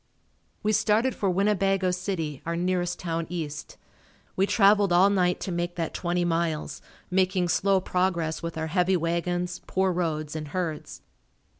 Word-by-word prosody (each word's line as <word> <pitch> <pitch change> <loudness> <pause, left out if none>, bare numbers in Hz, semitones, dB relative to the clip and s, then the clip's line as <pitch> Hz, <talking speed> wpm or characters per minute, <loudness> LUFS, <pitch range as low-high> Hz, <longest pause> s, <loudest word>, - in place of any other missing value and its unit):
We 215 - +2
started 225 +5 +2
for 195 - -1
Winnebago 195 0 +2
City, 175 -6 -3
our 170 +1 -2
nearest 180 0 -1
town 165 -2 -3
east. 155 -4 -5 0.6
We 195 +1 +2
traveled 200 -2 +4
all 185 +3 +5
night 180 -2 +2
to 190 - -3
make 175 0 -2
that 165 -2 -3
twenty 175 0 -1
miles, 165 -2 -1 0.3
making 185 -1 +2
slow 195 +2 +3
progress 180 -3 -1
with 170 -1 -5
our 160 - -2
heavy 180 +3 +2
wagons, 175 +1 -2
poor 190 0 +1
roads 155 -4 -2
and 155 -1 -4
herds. 160 -1 -4
180 Hz, 150 wpm, -26 LUFS, 165-190 Hz, 0.6 s, all